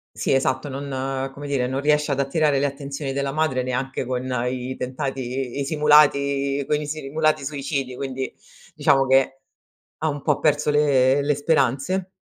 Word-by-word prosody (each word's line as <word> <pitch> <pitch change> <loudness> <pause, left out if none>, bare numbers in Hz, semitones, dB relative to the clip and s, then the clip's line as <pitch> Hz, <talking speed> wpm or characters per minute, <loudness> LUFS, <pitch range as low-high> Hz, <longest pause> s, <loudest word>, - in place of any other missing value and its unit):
Sì - - 0
esatto 130 +1 0
non 135 -1 -3
come 145 +2 -8
dire 135 -3 0
non 130 +2 -2
riesce 150 0 +2
ad 140 - 0
attirare 145 0 +2
le 140 - +2
attenzioni 140 0 -5
della 140 0 -1
madre 140 -4 0
neanche 130 +1 -2
con 125 0 -2 0.2
i 125 +1 -3
tentati 130 0 -4
i 140 - -1
simulati 140 -2 +3
con 150 - +2
i 150 - -5
simulati 155 0 0
suicidi 140 -2 -3
quindi 130 -1 -4 0.4
diciamo 135 -1 +3
che 135 0 +2 0.6
ha 160 - -1
un 145 -2 -2
po' 150 0 +1
perso 150 -1 +2
le 140 -2 +3
le 145 +1 +1
speranze. 145 +5 0
140 Hz, 160 wpm, -23 LUFS, 130-145 Hz, 0.6 s, simulati